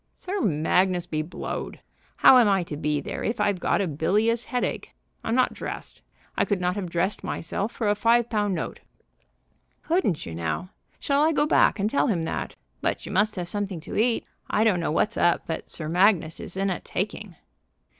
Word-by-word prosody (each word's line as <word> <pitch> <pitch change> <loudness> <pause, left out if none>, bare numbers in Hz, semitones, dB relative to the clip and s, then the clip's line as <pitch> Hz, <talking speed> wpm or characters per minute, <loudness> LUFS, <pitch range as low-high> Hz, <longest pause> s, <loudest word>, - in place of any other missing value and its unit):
"Sir 385 +1 -4
Magnus 180 - +2
be 155 -3 -2
blowed! 155 +4 -5 0.4
How 255 - +8
am 230 -4 +5
I 195 -2 +2
to 160 - -6
be 150 0 -1
there - - -5
if 225 +1 -2
I've 205 -3 +1
got 200 - +1
a 195 - 0
bilious 210 +10 +1
headache? 250 -1 -3 0.3
I'm 225 - 0
not 255 0 +3
dressed. - - -7 0.3
I - - +2
could 200 -3 0
not 180 0 0
have 195 -4 -4
dressed 175 +5 -1
myself 195 +3 -3
for 225 - -2
a 205 - +4
five 230 +2 +3
pound 210 -4 0
note." 160 - -4 1.0
"Couldn't 325 - 0
you, 80 - -6
now? 85 - -3 0.3
Shall 280 0 +1
I 315 +2 +4
go 295 - +2
back 300 - +4
and 200 0 0
tell 280 +5 +1
him 180 -9 0
that? 160 - -4 0.3
But - - -1
you - - -6
must 210 +3 +2
have 180 -2 -4
something 200 -2 -3
to - - -7
eat. 230 +2 +2 0.2
I 215 - +2
don't 210 -6 +3
know 165 - -1
what's 210 +8 +1
up, 175 - +3
but 160 - -5
Sir 155 - -4
Magnus 175 -1 +3
is 185 - -6
in 195 0 +1
a 180 - -2
taking." 200 -1 -4
195 Hz, 200 wpm, -25 LUFS, 170-220 Hz, 1.0 s, How